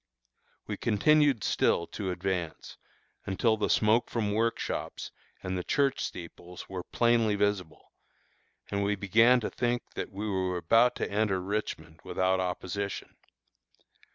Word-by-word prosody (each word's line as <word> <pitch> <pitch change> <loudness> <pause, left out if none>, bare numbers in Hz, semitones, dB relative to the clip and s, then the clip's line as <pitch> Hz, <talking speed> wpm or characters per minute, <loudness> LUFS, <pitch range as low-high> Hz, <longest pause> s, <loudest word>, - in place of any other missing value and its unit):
We - - -4
continued 145 +1 +3
still 85 - +2
to 95 +2 -5
advance, 90 -3 -4 0.5
until 110 +4 +2
the 105 - -1
smoke 110 +2 +3
from 105 -3 -1
workshops, 115 +2 -2 0.3
and 95 0 -3
the 90 - -2
church 140 +3 +1
steeples 90 +1 -8
were 95 -1 -5
plainly 115 +1 +2
visible, 100 -5 -2 0.8
and 100 0 0
we 105 +1 +1
began 115 +6 +4
to - - -3
think 120 0 -1
that - - -5
we 100 +2 -4
were 95 -2 -1
about 115 +8 +4
to - - -3
enter 100 -2 +1
Richmond 90 -5 -4
without 95 0 +1
opposition. 95 +2 -4
100 Hz, 130 wpm, -29 LUFS, 95-115 Hz, 0.8 s, began